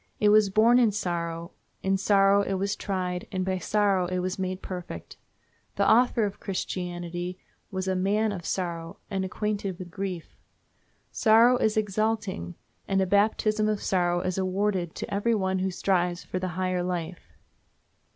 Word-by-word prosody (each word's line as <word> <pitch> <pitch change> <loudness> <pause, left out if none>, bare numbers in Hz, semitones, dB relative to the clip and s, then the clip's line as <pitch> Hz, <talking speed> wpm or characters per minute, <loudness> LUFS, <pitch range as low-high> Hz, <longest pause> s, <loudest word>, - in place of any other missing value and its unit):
It 210 - +4
was 210 -1 +5
born 225 +5 +5
in 235 -3 +5
sorrow, 170 -4 -3 0.3
in 195 0 +2
sorrow 195 0 +4
it 195 -1 -1
was 200 +2 -1
tried, 180 -2 -3
and 185 -2 -1
by 190 -1 -1
sorrow 195 -1 +1
it 185 +1 -2
was 185 +1 -2
made 185 0 -3
perfect. 180 - -7 0.6
The 200 - +2
Author 235 -1 +4
of 200 -1 -5
Christianity 180 -2 -4 0.3
was 190 -1 -3
a 190 - +1
"man 205 +4 +1
of 185 -4 -5
sorrow 170 -2 -3
and 195 -1 -1
acquainted 200 -1 -2
with 180 -1 -9
grief." 190 -3 -5 0.8
Sorrow 230 +3 +5
is 220 -2 +1
exalting, 210 - -1 0.3
and 195 0 +1
a 190 - +3
baptism 215 +2 +2
of 210 -1 0
sorrow 175 -2 +1
is 185 +1 -2
awarded 190 -2 -1
to - - -5
every 225 +3 +1
one 190 -2 0
who 190 +1 0
strives 180 -1 0
for 185 - -4
the 185 - -2
higher 185 -1 0
life. 175 -1 -5
190 Hz, 160 wpm, -27 LUFS, 180-205 Hz, 0.8 s, was